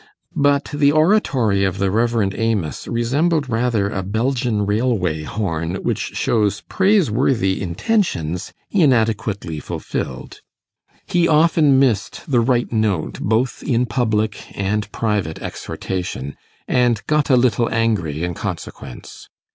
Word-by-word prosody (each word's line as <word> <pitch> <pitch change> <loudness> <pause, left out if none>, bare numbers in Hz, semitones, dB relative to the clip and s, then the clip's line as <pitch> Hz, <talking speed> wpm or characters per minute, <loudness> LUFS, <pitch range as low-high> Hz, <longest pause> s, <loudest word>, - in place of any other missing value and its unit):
But 140 0 +3
the 145 -1 +4
oratory 145 - +2
of 95 -1 0
the 95 -1 0
Rev. 115 -2 +1
Amos 110 -9 -2
resembled 140 +6 +1
rather 115 -3 +1
a 95 - -2
Belgian 110 +1 -1
railway 105 -7 0
horn, 85 -1 -3
which - - -2
shows 105 -4 +1
praiseworthy 135 - +1
intentions 90 - -1 0.2
inadequately 110 - +1
fulfilled. - - -5 0.6
He 175 -1 +2
often 155 -3 +4
missed 125 - +1
the 130 -5 +2
right 120 0 +1
note 105 -7 0
both 115 +3 0
in 125 -2 +1
public 110 -3 -2
and 100 +1 -1
private 105 -8 -1
exhortation, 90 -7 -5 0.3
and 120 -3 +2
got 150 -1 +1
a 130 - +5
little 120 -2 +2
angry 100 -10 0
in 90 0 -2
consequence. 65 -5 -7
115 Hz, 115 wpm, -20 LUFS, 100-130 Hz, 0.6 s, a